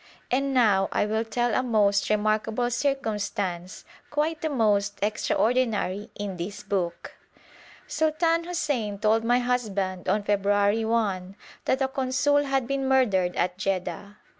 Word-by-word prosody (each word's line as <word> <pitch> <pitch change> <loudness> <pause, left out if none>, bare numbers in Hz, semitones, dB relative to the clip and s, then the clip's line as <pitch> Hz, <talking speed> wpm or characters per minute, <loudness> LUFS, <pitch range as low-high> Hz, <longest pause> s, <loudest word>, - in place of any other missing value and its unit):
And 275 +2 +1
now 210 -7 +3
I - - +1
will 220 +1 0
tell 240 +1 -1
a - - +2
most 210 -5 +2
remarkable 215 +3 0
circumstance, 210 - -2 0.2
quite 310 +2 -1
the 315 - -1
most 210 -6 +1
extraordinary 215 -2 0
in 200 -3 -5
this 180 +4 -6
book. 190 -4 -3 0.7
Sultan 330 +2 +1
Hussein 285 - -2
told 220 +2 +2
my 240 +2 +3
husband 205 -7 -1
on 205 +2 +1
February 205 +2 +2
1 200 -5 -1 0.3
that 265 +1 +1
a - - +2
consul 265 +2 +1
had 270 -2 0
been 270 +1 -2
murdered 205 -10 +2
at 180 +1 -1
Jedda. 195 +1 -3
215 Hz, 135 wpm, -26 LUFS, 200-255 Hz, 0.7 s, now